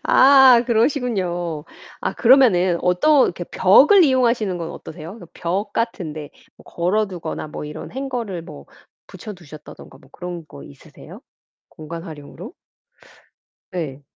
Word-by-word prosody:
아 265 -3 +6
그러시군요. 195 - -1 0.4
아 - - -2
그러면은 215 -9 +4
어떤 260 +12 +3
이렇게 175 0 -4
벽을 290 - +5
이용하시는 235 - +1
건 165 -1 -5
어떠세요? 160 +2 -10
그래서 180 -7 -13
벽 195 +5 -3
같은 215 -10 -3
데 150 -1 -8 0.3
뭐 - - -19
걸어 195 +5 -1
두거나 180 -4 -6
뭐 150 - -7
이런 150 +1 -8
행거를 240 -9 -5
뭐 70 - -12 0.4
붙여 215 - -10
두셨다든가 155 -6 -14
뭐 - - -22
그런 175 -2 -7
거 70 - -13
있으세요 70 - -14 0.5
공간 165 +2 -9
활용으로? 160 - -10 1.2
네. 150 -6 -6
180 Hz, 295 characters per minute, -20 LUFS, 165-235 Hz, 1.2 s, 아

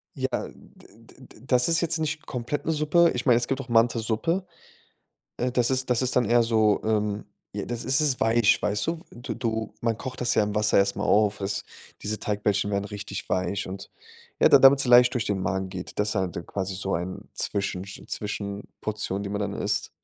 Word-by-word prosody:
Ja, - - -1 0.2
d - - -18 0.2
d - - -19
d - - -16
das 125 -2 +3
ist 165 0 +3
jetzt 165 -1 0
nicht 155 0 -3
komplett 125 +3 -3
'ne 160 - +1
Suppe 160 +3 +3
ich 125 - -3
meine, 125 -4 +5
es 120 - -1
gibt 135 0 -1
auch 130 - -12
Mantisuppe, 115 - +1 0.9
äh, 125 +1 0
das 125 0 +1
ist 130 0 -1
das 125 +1 +2
ist 130 - -1
dann 125 - +3
eher 120 +2 +4
so, 110 -2 +3
ähm, 105 -1 0 0.3
j 100 -1 -4
das 120 -1 -4
ist 135 +3 +2
es 145 -5 +1
weich, 115 -1 +3
weißt 105 +3 0
du? 165 0 -2
Du 120 - -6
du 110 -2 -3
man 115 -2 0
kocht 130 +3 -6
das 120 -1 +1
ja 110 - +4
im 105 0 -4
Wasser 105 0 +3
erst 100 0 +2
mal 100 - -4
auf, 105 0 +3
es 100 +1 -2 0.4
diese 105 +1 -3
Teigbällchen 100 -1 0
werden 100 0 -1
richtig 100 -1 -6
weich 95 +2 -1
und, 95 +1 -8 0.5
ja, - - +7
da - - +8
damit 135 +1 +7
sie 135 - -1
leicht 125 0 +7
durch 120 -4 0
den 100 -2 -1
Magen 95 0 -1
geht. 90 -1 -8
Deshalb 105 -3 0
dann 85 - -7
quasi 95 -1 -3
so 95 +1 -2
ein 90 +3 -5
Zwischensch 95 -1 -3
Zwischenportion, 100 0 -4
die - - -4
man 100 - -2
dann 105 - -2
isst. - - -2
110 Hz, 215 wpm, -26 LUFS, 100-125 Hz, 0.9 s, da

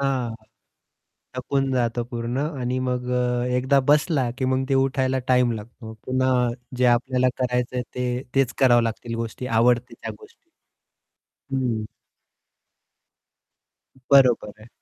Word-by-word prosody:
हां, 130 -4 -1 1.0
थकून 135 +1 -1
जातं 120 -1 0
पूर्ण 120 +2 -3 0.2
आणि 125 +1 -1
मग 125 -1 -2
अ, 125 -1 0
एकदा 130 +2 +3
बसला 145 -4 +2
की 130 - -1
मग 130 +1 +1
ते 135 - +2
उठायला 130 0 +1
टाईम 125 -1 +3
लागतो 110 +1 -9
पुन्हा. 130 -1 +2 0.3
जे 125 - +1
आपल्याला 125 +1 +2
करायचंय 125 0 -1
ते 125 0 -2
तेच 135 -3 +2
करावं 120 -3 +5
लागतील 115 +1 -4
गोष्टी, 115 +2 -5
आवडते 120 +1 +2
त्या - - -4
गोष्टी. 430 -5 -19 1.1
हम्म 120 -4 -1 2.3
बरोबर 125 -6 +5
आहे. 110 - -14
125 Hz, 120 wpm, -23 LUFS, 120-130 Hz, 2.3 s, करावं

